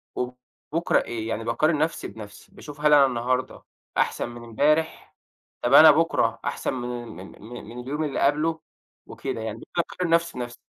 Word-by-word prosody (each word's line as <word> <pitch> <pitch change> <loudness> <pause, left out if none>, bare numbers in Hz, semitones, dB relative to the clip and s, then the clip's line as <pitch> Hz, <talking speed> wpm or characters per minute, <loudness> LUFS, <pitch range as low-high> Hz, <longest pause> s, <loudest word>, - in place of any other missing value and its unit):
وبُكرة 125 +6 -2
إيه، 115 -2 -5
يعني 115 0 -3
باقارن 150 +8 +1
نَفْسي 155 +2 -1
بنَفْسي، 105 -2 -12
باشوف 145 -1 -11
هل 150 0 +5
أنا 145 -2 +7
النهاردة 130 0 -2 0.3
أحسَن - - 0
من 120 0 -10
إمبارح؟ 150 +8 0 0.5
طَب 120 - 0
أنا 155 +2 +10
بُكرة 165 +3 +1
أحسن - - -2
من 120 -1 -4 0.3
ال - - -20
من 120 +3 -9
من 120 +3 -9
اليوم 140 +5 -3
اللي 145 -3 -2
قبله؟ 155 +3 +1 0.5
وكده 115 - -5
يعني، 110 0 -5 0.2
باقارن 170 +1 -1
نَفْسي 170 -2 +1
بنَفْسي. 120 -1 -5
130 Hz, 165 wpm, -25 LUFS, 120-155 Hz, 0.5 s, أنا